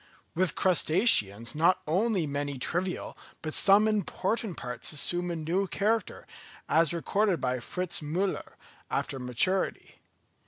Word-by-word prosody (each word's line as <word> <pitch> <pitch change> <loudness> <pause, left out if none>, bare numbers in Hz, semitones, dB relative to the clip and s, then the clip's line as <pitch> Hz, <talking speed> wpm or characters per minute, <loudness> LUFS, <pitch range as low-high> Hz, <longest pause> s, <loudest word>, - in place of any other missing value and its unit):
With 185 +1 0
crustaceans 155 - +3
not 180 +4 +2
only 185 +2 0
many 145 -1 -4
trivial, 180 +8 -3 0.3
but 155 -1 -4
some 205 +2 +5
important 210 -1 -2
parts 125 -1 -3
assume 175 +4 +1
a 170 - -3
new 170 +5 -1
character, 215 +2 -2 0.4
as 165 -1 +2
recorded 190 +2 0
by 125 -1 -2
Fritz 180 +8 -1
Müller, 175 +6 -3 0.4
after 135 - -3
maturity. 125 +10 -1
175 Hz, 120 wpm, -28 LUFS, 150-195 Hz, 0.4 s, some